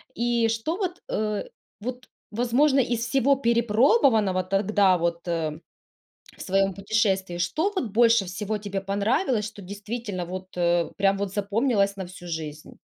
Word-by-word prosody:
И 235 Hz, -1 st, +1 dB
что 225 Hz, +9 st, -1 dB
вот, 370 Hz, -3 st, -3 dB
э, 210 Hz, -1 st, -1 dB, 0.3 s
вот 250 Hz, +3 st, -6 dB, 0.2 s
возможно 250 Hz, +5 st, +2 dB
из 240 Hz, -2 st, 0 dB
всего 270 Hz, +2 st, +3 dB
перепробованного 230 Hz, -, +3 dB
тогда 195 Hz, 0 st, +2 dB
вот, 170 Hz, 0 st, -2 dB
э, 160 Hz, -2 st, -2 dB, 0.8 s
в -, -, -9 dB
своем 195 Hz, 0 st, +1 dB
путешествии, 195 Hz, -3 st, 0 dB
что 315 Hz, -, 0 dB
вот 370 Hz, -10 st, -1 dB
больше 230 Hz, -1 st, +4 dB
всего 205 Hz, +4 st, -3 dB
тебе 200 Hz, -1 st, -4 dB
понравилось, 210 Hz, -, 0 dB
что 215 Hz, -2 st, -9 dB
действительно 205 Hz, 0 st, -5 dB
вот, 185 Hz, +1 st, -6 dB
э, 175 Hz, -1 st, +1 dB
прям 195 Hz, 0 st, +2 dB
вот 200 Hz, -1 st, -3 dB
запомнилось 205 Hz, 0 st, +1 dB
на 190 Hz, -2 st, -5 dB
всю 175 Hz, 0 st, -12 dB
жизнь? 155 Hz, -3 st, -6 dB
205 Hz, 145 wpm, -25 LUFS, 190-235 Hz, 0.8 s, больше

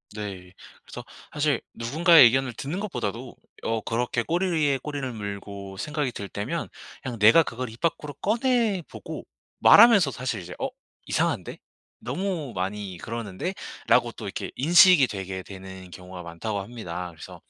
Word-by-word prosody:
네. 95 Hz, -4 st, -7 dB, 0.3 s
그래서 -, -, -9 dB, 0.3 s
사실 145 Hz, -3 st, +1 dB
누군가의 160 Hz, +6 st, +6 dB
의견을 130 Hz, +1 st, +2 dB
듣는 145 Hz, -, -4 dB
것보다도 125 Hz, -, -4 dB, 0.3 s
어 115 Hz, -1 st, -1 dB
그렇게 120 Hz, +1 st, -1 dB
꼬리 175 Hz, +3 st, 0 dB
위에 145 Hz, -5 st, +2 dB
꼬리를 140 Hz, -3 st, -4 dB
물고 100 Hz, -2 st, -7 dB
생각이 150 Hz, +1 st, -2 dB
들 100 Hz, -2 st, -6 dB
때면 105 Hz, +13 st, -4 dB, 0.4 s
그냥 125 Hz, -5 st, -5 dB
내가 110 Hz, +11 st, +7 dB
그걸 125 Hz, -2 st, -5 dB
입 115 Hz, +2 st, -13 dB
밖으로 150 Hz, -3 st, -1 dB
꺼내보고 225 Hz, -, -1 dB, 0.3 s
말하면서 210 Hz, -8 st, +8 dB
사실 120 Hz, -6 st, -3 dB
이제 90 Hz, 0 st, -9 dB
'어 -, -, -1 dB, 0.4 s
이상한데? -, -, -1 dB, 0.4 s
너무 155 Hz, -, -3 dB
많이 95 Hz, 0 st, -4 dB
그러는데?'라고 115 Hz, -, -2 dB
또 -, -, -9 dB
이렇게 -, -, -5 dB
인식이 170 Hz, 0 st, +7 dB
되게 95 Hz, -3 st, -5 dB
되는 95 Hz, -1 st, -10 dB
경우가 90 Hz, +1 st, -9 dB
많다고 100 Hz, +5 st, -4 dB
합니다. 90 Hz, -5 st, -6 dB
그래서 80 Hz, -, -12 dB
120 Hz, 335 characters per minute, -25 LUFS, 100-155 Hz, 0.4 s, 말하면서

